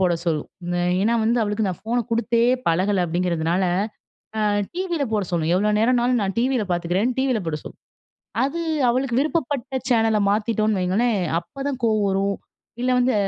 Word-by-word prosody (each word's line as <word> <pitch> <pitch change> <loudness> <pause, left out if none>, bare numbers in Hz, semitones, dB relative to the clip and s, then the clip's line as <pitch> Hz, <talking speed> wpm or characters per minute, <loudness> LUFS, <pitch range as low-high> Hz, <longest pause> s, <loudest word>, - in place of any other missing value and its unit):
போட 180 -2 +3
சொல்லும். 155 -3 -1 0.2
நான் 175 0 +1
ஏன்னா 225 +4 +2
வந்து 235 +2 +2
அவளுக்கு 210 0 0
நான் 180 - -5
ஃபோனை 235 +3 -1
குடுத்தே 230 0 +1 0.3
பழகலை 185 +4 +2
அப்படிங்கிறதுனால, 170 +1 0 0.7
அ - - 0 0.3
டிவியில 350 -5 -1
போட 210 -2 +1
சொல்லும். 165 -1 0
எவ்வளோ 210 +3 +2
நேரம்னாலும் 245 0 +2
நான் 195 -1 -2
டிவியில 250 -1 +1
பார்த்துக்கிறேன்னு 180 +9 0
டிவியில 260 -4 +1
போட 155 -1 -1
சொல்லும். - - -11 0.6
அது 295 +5 -1 0.3
அவளுக்கு 250 0 0
விருப்பப்பட்ட 285 -4 -1
சேனலை 225 -3 +3
மாத்திட்டோம்னு 215 -1 +1
வையுங்களேன், 205 +5 +1 0.2
அப்போதான் 275 +7 -5
கோவம் 215 -2 +2
வரும், 195 +1 0 0.5
இல்லை 255 - +1
வந்து 250 +1 +2
220 Hz, 155 wpm, -22 LUFS, 185-250 Hz, 0.7 s, போட